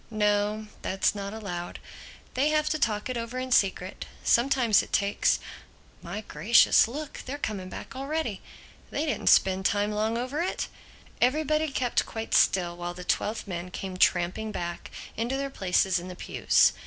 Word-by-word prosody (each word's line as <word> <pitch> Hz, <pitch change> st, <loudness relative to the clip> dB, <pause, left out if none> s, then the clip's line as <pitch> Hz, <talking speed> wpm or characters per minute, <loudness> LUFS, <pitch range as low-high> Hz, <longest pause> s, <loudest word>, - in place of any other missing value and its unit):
"No, 210 Hz, 0 st, +1 dB, 0.2 s
that's 190 Hz, 0 st, +1 dB
not 200 Hz, -1 st, -5 dB
allowed. 180 Hz, -5 st, -5 dB, 0.6 s
They 275 Hz, +4 st, +2 dB
have 305 Hz, 0 st, +2 dB
to 310 Hz, -, -1 dB
talk 210 Hz, -5 st, 0 dB
it 255 Hz, -1 st, -3 dB
over 230 Hz, +2 st, -4 dB
in 255 Hz, 0 st, -4 dB
secret. 190 Hz, -4 st, +1 dB, 0.2 s
Sometimes 240 Hz, -3 st, +4 dB
it -, -, -10 dB
takes—My 200 Hz, +1 st, -2 dB
Gracious, 220 Hz, +2 st, +5 dB
look, 290 Hz, +5 st, -6 dB
they're 280 Hz, +3 st, -3 dB
coming 200 Hz, -9 st, -4 dB
back -, -, -8 dB
already! 275 Hz, -5 st, -3 dB, 0.5 s
They 295 Hz, -, -1 dB
didn't 295 Hz, -, -2 dB
spend 190 Hz, 0 st, +4 dB
long 210 Hz, +2 st, 0 dB
over 255 Hz, +6 st, -2 dB
it." 360 Hz, -, -2 dB, 0.5 s
Everybody 305 Hz, +4 st, +2 dB
kept 250 Hz, -3 st, 0 dB
quite 225 Hz, 0 st, -5 dB
still 175 Hz, -2 st, +3 dB
while 175 Hz, 0 st, -5 dB
the 180 Hz, -, -7 dB
twelve 210 Hz, +4 st, -1 dB
men 175 Hz, -1 st, -5 dB
came 185 Hz, +1 st, -6 dB
tramping 185 Hz, +4 st, +2 dB
back 175 Hz, -3 st, -5 dB, 0.3 s
into 240 Hz, +4 st, -1 dB
their 275 Hz, 0 st, -3 dB
places 190 Hz, -3 st, +1 dB
in 175 Hz, -, -8 dB
the 180 Hz, -, -7 dB
pews. -, -, +3 dB
215 Hz, 155 wpm, -27 LUFS, 190-260 Hz, 0.6 s, Gracious